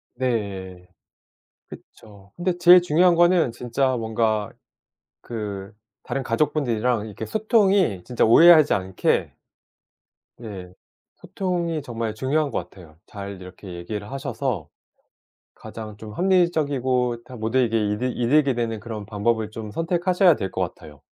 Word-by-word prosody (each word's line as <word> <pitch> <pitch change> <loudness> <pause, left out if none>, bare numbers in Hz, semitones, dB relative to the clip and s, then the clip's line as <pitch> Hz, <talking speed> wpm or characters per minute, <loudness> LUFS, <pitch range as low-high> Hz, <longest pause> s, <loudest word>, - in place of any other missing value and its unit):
네. 100 -8 -3 0.8
그쵸. 100 -2 -15
근데 175 0 -1
제일 175 +1 +8
중요한 175 +1 +3
거는 175 -5 +4
진짜 125 +3 -1
뭔가 110 -2 -1 0.7
그 105 -4 -6 0.3
다른 135 - -3
가족분들이랑 120 -3 0
이렇게 110 +1 -7
소통이 200 - +2
진짜 125 - 0
오해하지 155 +6 +7
않게 95 -1 0 1.1
네. 95 -6 -9 0.4
소통이 170 -4 -3
정말 115 -4 -4
중요한 140 +5 0
것 90 - -4
같아요. 85 -5 -16
잘 100 -2 -8
이렇게 90 +1 -10
얘기를 100 +4 -6
하셔서 130 - -3 0.8
가장 110 -2 -9
좀 105 0 -10
합리적이고 140 - +1
다 130 - -11
모두에게 115 +1 +1 0.2
이득이 125 +4 -2
이득이 135 +2 +3
되는 115 -2 -2
그런 110 -1 -7
방법을 110 +1 -1
좀 110 -1 -7
선택하셔야 175 - +2
될 95 - -4
것 - - -3
같아요. 75 -2 -7
115 Hz, 280 characters per minute, -23 LUFS, 105-155 Hz, 1.1 s, 제일